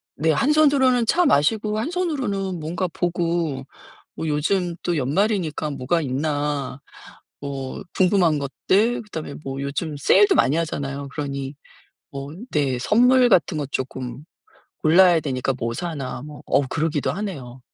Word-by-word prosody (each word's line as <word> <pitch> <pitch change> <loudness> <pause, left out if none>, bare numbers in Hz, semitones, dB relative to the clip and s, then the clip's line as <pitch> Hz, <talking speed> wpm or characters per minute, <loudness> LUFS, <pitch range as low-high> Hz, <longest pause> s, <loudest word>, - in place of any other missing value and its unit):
네. 160 +3 +2
한 265 - +2
손으로는 270 -5 +4
차 355 +8 +3
마시고 210 - +2
한 230 - -2
손으로는 250 - -2
뭔가 165 +4 -2
보고 170 -5 -1 0.5
뭐 160 - -4
요즘 170 +4 0
또 175 -2 0
연말이니까 155 - 0
뭐가 145 +5 0
있나 145 -1 -2 0.6
뭐 135 -2 -5 0.2
궁금한 180 -5 +3
것들 195 - +1
그다음에 160 -8 -7
뭐 135 0 -5
요즘 145 +3 -3
세일도 195 +9 +5
많이 135 +3 +3
하잖아요. 140 -4 -3
그러니 140 -2 -4 0.6
뭐 140 0 -7 0.2
네. 135 -4 +1
선물 250 - +5
같은 180 -5 +3
거 145 - -2
조금 130 0 -5 0.6
골라야 175 +1 +6
되니까 135 -2 -1
'뭐 115 -1 -2
사나.' 145 -6 -4
뭐 150 0 -10
어우 140 - +2
그러기도 155 -2 0
하네요. 140 -12 -6
155 Hz, 290 characters per minute, -22 LUFS, 140-195 Hz, 0.6 s, 골라야